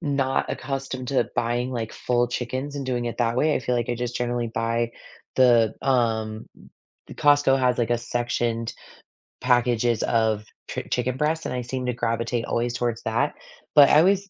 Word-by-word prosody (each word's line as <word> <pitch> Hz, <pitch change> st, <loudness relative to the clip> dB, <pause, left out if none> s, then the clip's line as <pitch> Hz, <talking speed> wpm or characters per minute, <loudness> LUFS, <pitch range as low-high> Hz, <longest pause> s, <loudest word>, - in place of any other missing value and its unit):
not 140 Hz, -4 st, 0 dB
accustomed 130 Hz, -1 st, -4 dB
to 135 Hz, -, +1 dB
buying, 120 Hz, +2 st, 0 dB
like, 115 Hz, -3 st, -4 dB
full 120 Hz, 0 st, +1 dB
chickens 130 Hz, +4 st, -4 dB
and 140 Hz, -, -4 dB
doing 125 Hz, -2 st, -1 dB
it 120 Hz, -, -4 dB
that 120 Hz, -1 st, +1 dB
way. 150 Hz, +4 st, +3 dB
I -, -, 0 dB
feel 125 Hz, -, -1 dB
like 120 Hz, -, -1 dB
I 120 Hz, -, 0 dB
just 120 Hz, 0 st, -3 dB
generally 120 Hz, -1 st, -1 dB
buy 115 Hz, +1 st, 0 dB, 0.5 s
the, 120 Hz, -4 st, +5 dB
um 110 Hz, -4 st, 0 dB, 0.6 s
The -, -, -9 dB
Costco 145 Hz, -2 st, +4 dB
has, 125 Hz, -1 st, +2 dB
like, 120 Hz, 0 st, 0 dB
a 120 Hz, -, +2 dB
sectioned 120 Hz, -1 st, -2 dB, 0.7 s
packages 120 Hz, -2 st, +2 dB
of 110 Hz, -2 st, +1 dB, 0.2 s
chi -, -, -3 dB
chicken 125 Hz, +1 st, 0 dB
breast, 155 Hz, +3 st, 0 dB
and -, -, -3 dB
I 125 Hz, -, -2 dB
seem 125 Hz, +1 st, -4 dB
to 125 Hz, -, 0 dB
gravitate 115 Hz, 0 st, -1 dB
always 120 Hz, 0 st, -1 dB
towards 120 Hz, -2 st, -2 dB
that, 115 Hz, +1 st, 0 dB, 0.4 s
but 145 Hz, -1 st, +9 dB
I 150 Hz, -, +6 dB
always 195 Hz, +3 st, +3 dB
120 Hz, 180 wpm, -24 LUFS, 115-130 Hz, 0.7 s, but